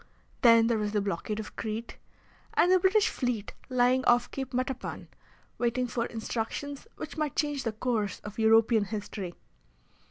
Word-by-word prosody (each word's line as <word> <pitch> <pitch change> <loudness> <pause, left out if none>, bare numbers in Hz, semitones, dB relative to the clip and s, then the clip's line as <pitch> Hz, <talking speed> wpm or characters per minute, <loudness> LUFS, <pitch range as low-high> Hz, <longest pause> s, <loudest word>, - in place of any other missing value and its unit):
Then 230 -2 +7
there 230 -1 +2
was 210 0 -2
the 210 - +2
blockade 200 +2 -3
of 215 - -7
Crete, 225 +1 -5 0.6
and 355 - +4
the 370 - +6
British 395 +3 +4
fleet 245 -5 -2 0.2
lying 255 +1 +3
off 240 0 +4
Cape 265 -2 -5
Matapan, 255 +1 -3 0.5
waiting 245 +1 +1
for 235 -1 -2
instructions 240 - -4
which - - -7
might 305 -3 -1
change 295 -2 0
the 225 - +1
course 220 -3 -1
of 210 +1 -8
European 225 -1 +5
history. 200 -3 -5
235 Hz, 155 wpm, -29 LUFS, 220-255 Hz, 0.6 s, Then